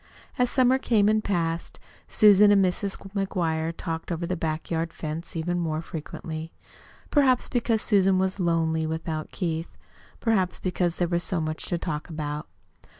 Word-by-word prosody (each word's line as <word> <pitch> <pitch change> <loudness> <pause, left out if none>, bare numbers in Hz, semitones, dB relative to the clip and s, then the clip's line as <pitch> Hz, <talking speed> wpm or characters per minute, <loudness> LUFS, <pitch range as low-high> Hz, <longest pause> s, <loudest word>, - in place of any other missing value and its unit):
As 250 -1 +3
the - - -4
summer 260 0 +4
came 215 -6 +3
and 215 0 +2
passed, 170 -4 -2 0.3
Susan 210 -1 +6
and 195 -2 +5
Mrs. 195 +2 -1 0.2
McGuire 165 -5 -1
talked 165 0 -4
over 170 0 -2
the 180 - -2
back 160 -1 -3
yard 165 0 -1
fence 160 +2 -5
even 175 +2 -1
more 160 -2 -1
frequently. 160 0 -6 0.6
Perhaps 265 -4 +3
because 230 -3 +1
Susan 195 -3 +3
was 190 +1 0
lonely 165 -2 +1
without 160 -1 -3
Keith. 165 -3 -3 0.4
Perhaps 195 -6 +1
because 180 -2 -1
there 175 - +1
was 170 0 0
so 180 0 -1
much 155 0 -3
to 175 - 0
talk 160 -1 -4
about. 150 -2 -4
175 Hz, 160 wpm, -26 LUFS, 160-200 Hz, 0.6 s, Susan